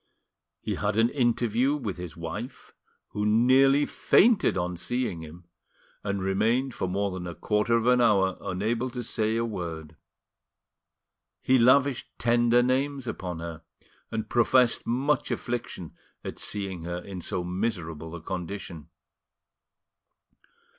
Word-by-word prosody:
He -, -, -2 dB
had 105 Hz, 0 st, -1 dB
an 115 Hz, +1 st, +4 dB
interview 120 Hz, +1 st, +1 dB
with 110 Hz, -11 st, -4 dB
his 90 Hz, -2 st, -8 dB
wife, 100 Hz, +10 st, -7 dB, 0.4 s
who 105 Hz, -, -3 dB
nearly 130 Hz, +6 st, +4 dB
fainted 225 Hz, 0 st, +3 dB
on 90 Hz, 0 st, -2 dB
seeing 120 Hz, -2 st, -2 dB
him, 80 Hz, +2 st, -11 dB, 0.6 s
and 100 Hz, -2 st, -2 dB
remained 115 Hz, +7 st, +1 dB
for 95 Hz, -, -2 dB
more 100 Hz, +2 st, -1 dB
than 90 Hz, -1 st, -5 dB
a 85 Hz, -, -6 dB
quarter 110 Hz, +2 st, +1 dB
of 115 Hz, -, -1 dB
an 125 Hz, 0 st, +4 dB
hour 95 Hz, -5 st, +3 dB
unable 110 Hz, +6 st, -1 dB
to 125 Hz, 0 st, -5 dB
say 110 Hz, -1 st, 0 dB
a 115 Hz, 0 st, 0 dB
word. 80 Hz, -7 st, -6 dB, 1.5 s
He 130 Hz, 0 st, +4 dB
lavished 130 Hz, +2 st, +4 dB
tender 120 Hz, 0 st, +3 dB
names 135 Hz, +1 st, 0 dB
upon 90 Hz, -7 st, -5 dB
her, 85 Hz, -1 st, -6 dB, 0.5 s
and 110 Hz, -1 st, -3 dB
professed 120 Hz, +1 st, +3 dB
much 135 Hz, +5 st, +1 dB
affliction 120 Hz, -8 st, -4 dB, 0.3 s
at -, -, -7 dB
seeing 95 Hz, -4 st, -4 dB
her 85 Hz, +1 st, -4 dB
in 90 Hz, 0 st, -7 dB
so 90 Hz, -, -3 dB
miserable 90 Hz, -4 st, -3 dB
a 80 Hz, -, -9 dB
condition. 90 Hz, -3 st, -6 dB
105 Hz, 135 wpm, -27 LUFS, 90-120 Hz, 1.5 s, an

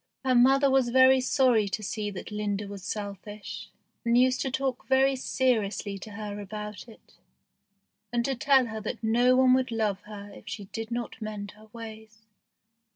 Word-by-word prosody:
Her 260 Hz, -, +3 dB
mother 270 Hz, +3 st, +5 dB
was 265 Hz, -2 st, +3 dB
very 260 Hz, +1 st, +6 dB
sorry 250 Hz, -5 st, +3 dB
to 215 Hz, -, -3 dB
see 210 Hz, +1 st, -3 dB
that 195 Hz, +1 st, -8 dB
Linda 210 Hz, -1 st, -2 dB
was 200 Hz, -2 st, -8 dB
selfish, 205 Hz, 0 st, -6 dB, 0.3 s
and 235 Hz, 0 st, +3 dB
used 255 Hz, +1 st, +3 dB
to 270 Hz, -, -1 dB
talk 260 Hz, 0 st, -2 dB
very 265 Hz, 0 st, +4 dB
seriously 220 Hz, -6 st, 0 dB
to 210 Hz, +2 st, -9 dB
her 205 Hz, -1 st, -6 dB
about 210 Hz, +2 st, -7 dB
it, 225 Hz, -, -18 dB, 0.9 s
and 240 Hz, -1 st, 0 dB
to 275 Hz, -, 0 dB
tell 265 Hz, 0 st, +4 dB
her 220 Hz, -1 st, -6 dB
that 235 Hz, +2 st, -5 dB
no 240 Hz, +3 st, +4 dB
one 255 Hz, 0 st, +5 dB
would 260 Hz, 0 st, +2 dB
love 215 Hz, -4 st, -1 dB
her 205 Hz, -1 st, -9 dB
if -, -, -13 dB
she 225 Hz, -2 st, -6 dB
did 225 Hz, +3 st, -6 dB
not 240 Hz, 0 st, -5 dB
mend 210 Hz, -2 st, -5 dB
her 215 Hz, +1 st, -18 dB
ways. 220 Hz, -1 st, -11 dB
225 Hz, 175 wpm, -28 LUFS, 210-255 Hz, 0.9 s, very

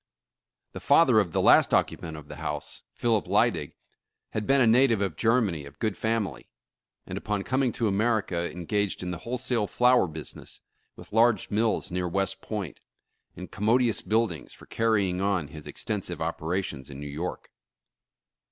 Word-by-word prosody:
The -, -, -7 dB
father 140 Hz, -6 st, +5 dB
of 95 Hz, -5 st, 0 dB
the -, -, 0 dB
last -, -, +6 dB
occupant 80 Hz, -2 st, -1 dB
of 75 Hz, -1 st, -11 dB
the -, -, -9 dB
house, -, -, -4 dB
Philip 115 Hz, -4 st, +1 dB
Lydig, -, -, +1 dB, 0.6 s
had 105 Hz, -1 st, -3 dB
been 135 Hz, +1 st, +4 dB
a 130 Hz, -, +5 dB
native 115 Hz, -1 st, +4 dB
of 95 Hz, -6 st, -1 dB
Germany 110 Hz, -7 st, +1 dB
of 70 Hz, +1 st, -12 dB
good 110 Hz, -3 st, -1 dB
family, 110 Hz, 0 st, -2 dB, 0.6 s
and -, -, -5 dB
upon 105 Hz, -2 st, -2 dB
coming 130 Hz, +1 st, +1 dB
to 115 Hz, -, 0 dB
America 100 Hz, -4 st, 0 dB
engaged 95 Hz, +3 st, -2 dB
in 90 Hz, -, -3 dB
the 85 Hz, -, -5 dB
wholesale 120 Hz, -3 st, -2 dB
flour 125 Hz, -3 st, +4 dB
business, 80 Hz, -1 st, -8 dB, 0.4 s
with -, -, -14 dB
large 115 Hz, -2 st, +3 dB
mills 110 Hz, -2 st, 0 dB
near 90 Hz, 0 st, -1 dB
West 95 Hz, +2 st, -1 dB
Point, 100 Hz, -8 st, -5 dB, 0.6 s
and 90 Hz, -, -9 dB
commodious 115 Hz, +2 st, +2 dB
buildings 110 Hz, -7 st, -1 dB
for -, -, -15 dB
carrying 100 Hz, -5 st, +1 dB
on 95 Hz, -7 st, 0 dB
his 75 Hz, -1 st, -10 dB
extensive -, -, -4 dB
op -, -, -3 dB
erations 80 Hz, -5 st, -3 dB
in 70 Hz, -1 st, -9 dB
New 75 Hz, -, -7 dB
York. 75 Hz, +5 st, -5 dB
100 Hz, 160 wpm, -27 LUFS, 90-115 Hz, 0.6 s, last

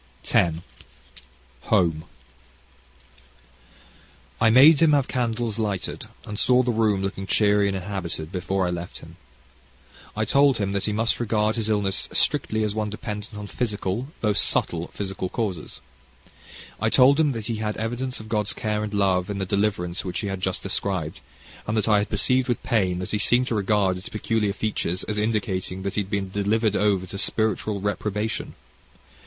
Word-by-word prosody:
CHAPTER 85 Hz, -2 st, +2 dB, 0.6 s
X -, -, -15 dB, 0.5 s
Home 80 Hz, -3 st, +2 dB, 2.4 s
I 115 Hz, -, +6 dB
made 140 Hz, +6 st, +8 dB
him 160 Hz, -2 st, +5 dB
have 140 Hz, -3 st, +3 dB
candles 115 Hz, -3 st, -1 dB
lighted, 100 Hz, -4 st, -3 dB, 0.2 s
and 105 Hz, -1 st, -5 dB
saw 125 Hz, 0 st, +4 dB
the 125 Hz, -, +1 dB
room 110 Hz, -4 st, +1 dB
looking 95 Hz, 0 st, -4 dB
cheery 105 Hz, -1 st, +3 dB
and 95 Hz, -1 st, -1 dB
inhabited 90 Hz, -4 st, -5 dB
before 95 Hz, 0 st, -1 dB
I 90 Hz, -, -1 dB
left 85 Hz, 0 st, -5 dB
him. -, -, -13 dB, 1.0 s
I 110 Hz, -, +1 dB
told 140 Hz, +2 st, +4 dB
him 100 Hz, -2 st, -1 dB
that 100 Hz, -1 st, -1 dB
he 105 Hz, -, 0 dB
must 115 Hz, +2 st, 0 dB
regard 110 Hz, -2 st, +1 dB
his 110 Hz, -2 st, -2 dB
illness 100 Hz, -3 st, 0 dB
strictly 110 Hz, 0 st, +1 dB
as 105 Hz, -1 st, -1 dB
one 110 Hz, -1 st, -2 dB
dependent 105 Hz, 0 st, -6 dB
on 105 Hz, -, -6 dB
physical, 105 Hz, +1 st, -2 dB
though 105 Hz, -2 st, +2 dB
subtle 85 Hz, -3 st, +1 dB
physical 95 Hz, -2 st, -4 dB
causes. 95 Hz, -9 st, -4 dB, 1.0 s
I 110 Hz, -, +1 dB
told 135 Hz, +5 st, +5 dB
him 150 Hz, -3 st, +3 dB
that 115 Hz, -3 st, -5 dB
he 115 Hz, -1 st, -2 dB
had 105 Hz, -1 st, -3 dB
evidence 120 Hz, +3 st, -3 dB
of 110 Hz, -, -10 dB
God's 105 Hz, -2 st, 0 dB
care 105 Hz, -2 st, -2 dB
and 105 Hz, -, -4 dB
love 95 Hz, -2 st, +2 dB
in 100 Hz, -, -3 dB
the 95 Hz, -, -2 dB
deliverance 95 Hz, -3 st, -1 dB
which 90 Hz, +2 st, -3 dB
he 105 Hz, -, -3 dB
had 95 Hz, -1 st, -4 dB
just 95 Hz, -1 st, -2 dB
described, 95 Hz, -5 st, -2 dB, 0.5 s
and 110 Hz, +1 st, 0 dB
that 110 Hz, -, +1 dB
I 105 Hz, -2 st, +5 dB
had 105 Hz, -, -2 dB
perceived 125 Hz, +5 st, +1 dB
with 120 Hz, -, -1 dB
pain 95 Hz, -6 st, +1 dB
that 90 Hz, 0 st, -4 dB
he 105 Hz, -, 0 dB
seemed 120 Hz, +3 st, +4 dB
to -, -, -1 dB
regard 100 Hz, -2 st, +1 dB
its 90 Hz, -, -7 dB
peculiar 105 Hz, -1 st, -1 dB
features 100 Hz, -4 st, -2 dB
as 105 Hz, 0 st, -3 dB
indicating 95 Hz, -4 st, -2 dB
that 100 Hz, -, -3 dB
he 105 Hz, -, +1 dB
had 95 Hz, -, -7 dB
been 100 Hz, -2 st, -2 dB
delivered 105 Hz, +2 st, +1 dB
over 100 Hz, -2 st, +2 dB
to 100 Hz, +2 st, -6 dB
spiritual 110 Hz, -1 st, 0 dB
reprobation. 105 Hz, +2 st, -2 dB
105 Hz, 175 wpm, -24 LUFS, 95-110 Hz, 2.4 s, made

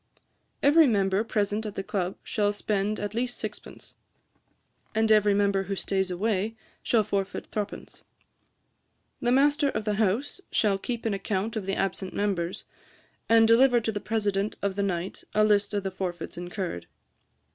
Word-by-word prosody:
'Every 300 Hz, +2 st, +6 dB
member 195 Hz, -2 st, +2 dB
present 210 Hz, -1 st, -1 dB
at 210 Hz, -2 st, -6 dB
the 195 Hz, -, -3 dB
Club 190 Hz, -2 st, -2 dB
shall 205 Hz, -1 st, 0 dB
spend 205 Hz, 0 st, -1 dB
at 205 Hz, 0 st, -4 dB
least 245 Hz, +2 st, -2 dB
sixpence; -, -, -8 dB, 1.0 s
and 220 Hz, 0 st, +2 dB
every 210 Hz, -1 st, +5 dB
member 200 Hz, -1 st, +2 dB
who 195 Hz, +1 st, -3 dB
stays 190 Hz, 0 st, -1 dB
away 205 Hz, +3 st, -1 dB, 0.3 s
shall 225 Hz, -3 st, +2 dB
forfeit 200 Hz, -1 st, -2 dB
three 210 Hz, -1 st, 0 dB
pence. 205 Hz, -, -11 dB, 1.2 s
'The 240 Hz, -, +1 dB
master 285 Hz, +2 st, +4 dB
of 215 Hz, -, -3 dB
the 210 Hz, -, +1 dB
house 225 Hz, -, 0 dB
shall 200 Hz, -3 st, +2 dB
keep 235 Hz, +2 st, -4 dB
an 220 Hz, -, +1 dB
account 195 Hz, +2 st, -2 dB
of 205 Hz, -3 st, -4 dB
the 195 Hz, -, 0 dB
absent 190 Hz, 0 st, -2 dB
members; 190 Hz, -4 st, -1 dB, 0.7 s
and 225 Hz, 0 st, +6 dB
deliver 245 Hz, +2 st, +5 dB
to 225 Hz, -1 st, -2 dB
the 205 Hz, -, -3 dB
President 205 Hz, -2 st, -1 dB
of 200 Hz, -1 st, 0 dB
the 200 Hz, -, -1 dB
night 185 Hz, -2 st, -3 dB
a 215 Hz, -, +5 dB
list 205 Hz, -1 st, +3 dB
of 205 Hz, -2 st, -1 dB
the 195 Hz, -, -2 dB
forfeits 180 Hz, -2 st, -5 dB
incurred. 175 Hz, -, -5 dB
205 Hz, 165 wpm, -27 LUFS, 195-220 Hz, 1.2 s, Every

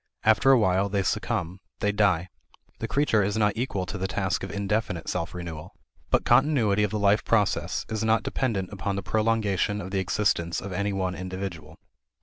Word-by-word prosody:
After 110 Hz, +4 st, +4 dB
a 135 Hz, -, +7 dB
while 95 Hz, -2 st, +2 dB
they 100 Hz, -1 st, 0 dB
succumb; 90 Hz, 0 st, -2 dB, 0.2 s
they 105 Hz, -, +1 dB
die. 100 Hz, -4 st, +2 dB, 0.5 s
The -, -, -3 dB
creature 140 Hz, -7 st, +2 dB
is 100 Hz, +2 st, 0 dB
not 105 Hz, -2 st, +3 dB
equal 110 Hz, -6 st, -2 dB
to 100 Hz, +2 st, -6 dB
the 95 Hz, -, -1 dB
task 95 Hz, 0 st, -1 dB
of 95 Hz, -, -5 dB
indefinite 100 Hz, -1 st, -2 dB
self 90 Hz, -1 st, -3 dB
renewal. 85 Hz, -1 st, -7 dB, 0.3 s
But -, -, +2 dB
continuity 120 Hz, -8 st, +3 dB
of 105 Hz, -, +2 dB
the 105 Hz, -, -2 dB
life 100 Hz, 0 st, +3 dB
process 105 Hz, -3 st, +1 dB
is 110 Hz, 0 st, -3 dB
not 110 Hz, -1 st, +2 dB
dependent 105 Hz, -8 st, -2 dB
upon 100 Hz, 0 st, -2 dB
the 100 Hz, -, -3 dB
prolongation 105 Hz, -1 st, +1 dB
of 95 Hz, -1 st, -6 dB
the 95 Hz, -, 0 dB
existence 90 Hz, -3 st, 0 dB
of 100 Hz, -1 st, -6 dB
any 100 Hz, +2 st, -1 dB
one 95 Hz, -2 st, -1 dB
individual. 90 Hz, -4 st, -6 dB
100 Hz, 185 wpm, -26 LUFS, 95-105 Hz, 0.5 s, a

